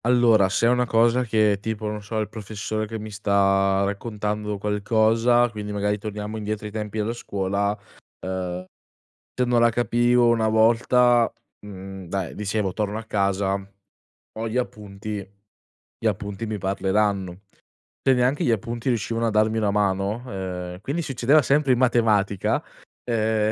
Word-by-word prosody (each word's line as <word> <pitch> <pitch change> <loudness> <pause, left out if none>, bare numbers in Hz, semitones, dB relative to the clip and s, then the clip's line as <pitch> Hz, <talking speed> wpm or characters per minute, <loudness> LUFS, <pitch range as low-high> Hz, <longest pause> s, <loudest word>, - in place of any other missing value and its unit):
Allora, 120 -5 +4
se 95 - +1
è - - +5
una 125 0 +2
cosa 115 +2 +3
che, 110 -3 +2
tipo, 110 0 -4
non 105 0 -3
so, 110 +2 -5
il 110 -1 0
professore 110 0 -4
che 110 +1 -5
mi 110 0 -7
sta 100 -1 +2
raccontando 105 0 -3
qualcosa, 110 +4 +2
quindi 105 -1 -6
magari 105 0 -1
torniamo 105 +1 -5
indietro 105 0 -4
ai 105 - -5
tempi 105 0 -5
della 110 +2 -1
scuola, 100 -2 -2 0.5
uhm, 90 -1 -4 0.7
se 125 - 0
non 120 -1 +2
la 120 0 +5
capivo 120 +1 +2
una 115 -2 +2
volta, 120 +2 +4 0.3
mhmm, 95 -2 -9
dai 95 -1 -3
dicevo: 105 -2 -2
"Torno 105 +1 -2
a 115 - -7
casa, 100 -2 0 0.9
ho 115 0 -2
gli 115 - -2
appunti, 105 -3 -4 0.8
gli - - -4
appunti 100 +1 -2
mi 110 -1 -3
parleranno". 95 -1 0 0.6
Se 135 - +4
neanche 125 +3 +1
gli - - +1
appunti 115 +3 -2
riuscivano 115 0 0
a - - +2
darmi 110 +1 +2
una 105 -2 +1
mano 100 +2 0
ehm, 90 -3 -5
quindi 145 +10 -2
succedeva 135 +2 +3
sempre 140 +1 +2
in - - +1
matematica. 110 -6 +2 0.4
Ehm, 110 -2 +1
105 Hz, 155 wpm, -24 LUFS, 100-115 Hz, 0.9 s, è